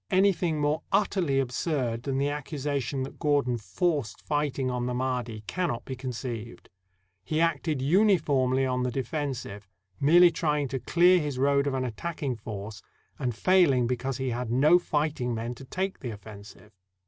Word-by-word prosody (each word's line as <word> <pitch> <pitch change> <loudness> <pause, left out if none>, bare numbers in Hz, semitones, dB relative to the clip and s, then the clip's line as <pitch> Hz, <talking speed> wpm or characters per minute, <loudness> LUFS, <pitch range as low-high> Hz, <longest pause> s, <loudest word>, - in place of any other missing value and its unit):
Anything 185 -4 +2
more 150 +2 +1
utterly 180 -9 +2
absurd 125 -2 -1
than 135 +1 -2
the 140 - +1
accu 145 +2 -4
sation 140 -1 -2
that 135 - -8
Gordon 145 -6 +1
forced 145 - -2
fighting 145 -3 -1
on 125 0 -2
the 125 - -2
Mahdi 125 -4 -2
caimot 175 -10 -2
be 130 - -5
conceived. 120 -3 -6 0.5
He 155 - -1
acted 155 -4 0
uniformly 145 -7 +3
on 125 -1 0
the 125 - 0
defensive, 125 -6 -4 0.3
merely 170 +5 +6
tr>ang 150 -4 0
to 135 +1 -3
clear 180 +6 +4
his 145 -4 -3
road 140 +1 +2
of 135 - 0
an 130 -1 -1
attacking 135 +2 -4
force, 105 0 -7 0.4
and 125 -5 -2
failing 155 - +4
because 125 +2 -2
he 130 -1 -2
had 120 0 -3
no 145 +9 +5
fighting 150 -7 -1
men 115 +2 -3
to 135 +2 -12
take 190 +7 -3
the 125 - -5
offen 105 -1 -11
sive. 105 0 -15
135 Hz, 165 wpm, -27 LUFS, 125-155 Hz, 0.5 s, merely